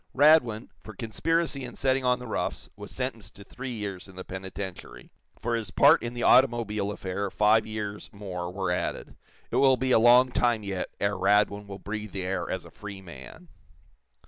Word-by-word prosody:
Radwin, 130 -6 +4
for 110 - -11
conspiracy 150 - -1
in 125 - -8
setting 130 0 +1
on 125 0 +3
the 125 - -9
roughs, 110 - -3
was - - -9
sentenced - - -5
to 100 - -12
three 125 +5 -7
years 105 -6 -5
in 95 - -15
the 95 - -7
penitentiary; 95 0 -8 0.3
for 120 +1 -2
his 115 -4 -2
part - - +5
in 120 +1 -5
the 120 - -3
automobile 115 -6 +3
affair 100 0 -3
five 105 +3 +3
years 105 -1 -5
more 90 -4 -6
were 95 -1 -2
added. 90 - -3 0.4
It - - 0
will 135 -2 +5
be 130 +1 0
a 115 - +6
long 125 +2 +6
time, 120 -3 +1
yet, 95 -2 -3
ere 100 0 0
Radwin 100 +2 +2
will 100 -1 -7
breathe 105 +1 -6
the 95 -1 -3
air 90 -1 -2
as - - -3
a - - -13
free 100 -2 -9
man. 95 - -11
105 Hz, 190 wpm, -27 LUFS, 100-120 Hz, 0.4 s, a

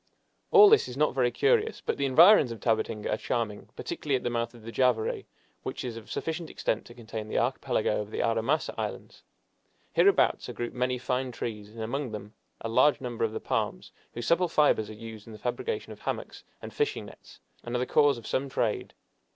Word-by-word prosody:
All 420 -2 +9
this 435 +1 +5
is 125 - -7
not 150 -2 +2
very 125 -2 +2
curious, 450 - +2
but - - -2
the 140 - +1
environs 160 - +7
of 115 - -6
Tabatinga 110 -1 0
are - - 0
charming, 110 -3 -3
particularly 145 -3 -2
at 130 - -2
the 120 - -1
mouth 115 0 -2
of 115 - -14
the 115 - -7
Javary, 125 -3 +1 0.4
which - - -5
is 120 -2 -4
of 115 -1 -10
sufficient 165 0 -3
extent 110 - -2
to 120 - -13
contain 110 -2 -6
the - - -2
Archipelago 120 -3 0
of 105 - -7
the - - -6
Aramasa 115 +7 +1
Islands. - - -5 0.7
Hereabouts 400 - +3
are - - -5
grouped 120 0 -4
many 125 0 0
fine 125 +1 -2
trees, 105 -3 -5
and 115 +1 -9
among 125 +1 -3
them 105 0 -7 0.3
a - - -3
large 130 +6 +4
number 120 -4 -4
of 110 - +1
the - - -4
palms, - - -2 0.2
whose 120 0 -4
supple 175 +7 +3
fibers 145 -9 +3
are - - -7
used 110 0 -10
in 115 - -10
the - - -9
fabrication 415 - -3
of - - -15
hammocks - - -5 0.2
and - - -7
fishing 440 -1 -1
nets, - - -15 0.2
and 120 +1 -4
are - - +3
the 125 - 0
cause 145 -1 +4
of 115 - -11
some 135 +1 -1
trade. 115 -4 -1
120 Hz, 210 wpm, -28 LUFS, 110-140 Hz, 0.7 s, All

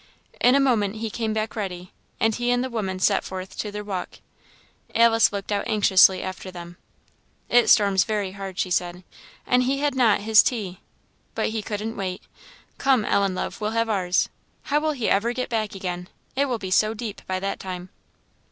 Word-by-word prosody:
In 250 +2 +5
a - - +5
moment 225 -7 +2
he 220 0 -4
came 225 0 -2
back 215 0 -2
ready, 185 -4 -5 0.3
and 225 0 +2
he 240 +2 -1
and 245 0 +2
the 260 - -4
woman 195 -5 -2
set 195 +1 +2
forth 190 0 -7
to 210 - -3
their 210 0 -5
walk. 195 -3 -5 0.8
Alice 230 -1 +5
looked 200 0 -5
out 200 -1 -1
anxiously 190 -3 +5
after 185 0 -6
them. 175 -1 -10 0.7
"It 240 0 +4
storms 200 -3 +5
very 205 -3 -2
hard," 195 -1 -7
she 185 - -1
said 180 0 -1 0.4
"and 250 0 +3
he 265 +2 +1
had 290 0 0
not 245 -5 +4
had 200 - -10
his 220 -1 +7
tea! 200 -7 -3 0.6
But - - 0
he 220 0 -3
couldn't 215 +2 -4
wait. 185 -2 -4 0.6
Come, 260 -5 +3
Ellen, 195 -2 +1
love, - - -4
we'll 215 +2 -2
have 230 0 +1
ours. 185 -4 +1 0.4
How 290 +1 +1
will 310 0 0
he 250 -6 -2
ever 230 +5 +2
get 255 0 -3
back 220 -4 -2
again? 180 -1 -5 0.3
it 280 +2 +2
will 250 -4 -1
be 190 -4 -6
so 215 +3 +3
deep 215 -2 -6
by 185 0 -1
that 195 +1 -3
time." 185 -1 -6
210 Hz, 200 wpm, -24 LUFS, 190-230 Hz, 0.8 s, his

